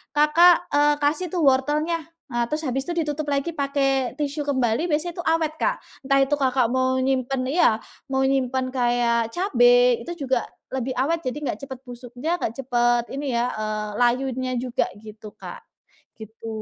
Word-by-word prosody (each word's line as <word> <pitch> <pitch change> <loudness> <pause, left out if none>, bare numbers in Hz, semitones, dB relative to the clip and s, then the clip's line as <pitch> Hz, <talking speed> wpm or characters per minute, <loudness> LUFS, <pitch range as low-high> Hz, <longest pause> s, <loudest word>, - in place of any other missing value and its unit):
Kakak, 330 +4 +5
eee, 295 0 +4
kasih 305 +5 +1
tuh 345 -1 -2
wortelnya, 295 +4 +1 0.2
eee, 240 0 0
terus 305 +3 -3
habis 270 0 -2
itu 340 -2 -1
ditutup 295 0 -4
lagi 280 +3 -1
pakai 275 -4 0
tisu 290 0 -3
kembali 260 +3 +1
biasanya 315 +2 -1
itu - - -3
awet 320 -1 +2
Kak, - - +1 0.3
entah 275 -1 +4
itu 290 +2 +1
Kakak 255 -3 +2
mau 260 0 +1
nyimpan 260 0 0
iya, 325 -6 +4 0.4
mau 265 0 0
nyimpen 260 -1 0
kayak 240 -2 +1
cabai 245 - +4
itu 340 -4 -5
juga 255 -3 0 0.2
lebih 260 0 -3
awet 320 +6 0
jadi 255 -3 -4
enggak - - -3
cepat 260 -2 -8
busuknya 250 +7 -4
nggak 220 - -2
cepat 240 -1 +2
ini 275 -2 -3
ya, 240 +1 +1
eee, 215 0 -3
layunya 255 +1 +1
juga 245 0 -1 0.2
gitu 215 0 -11
Kak, - - -9 0.6
gitu. 220 +1 -10
265 Hz, 165 wpm, -23 LUFS, 245-295 Hz, 0.6 s, Kakak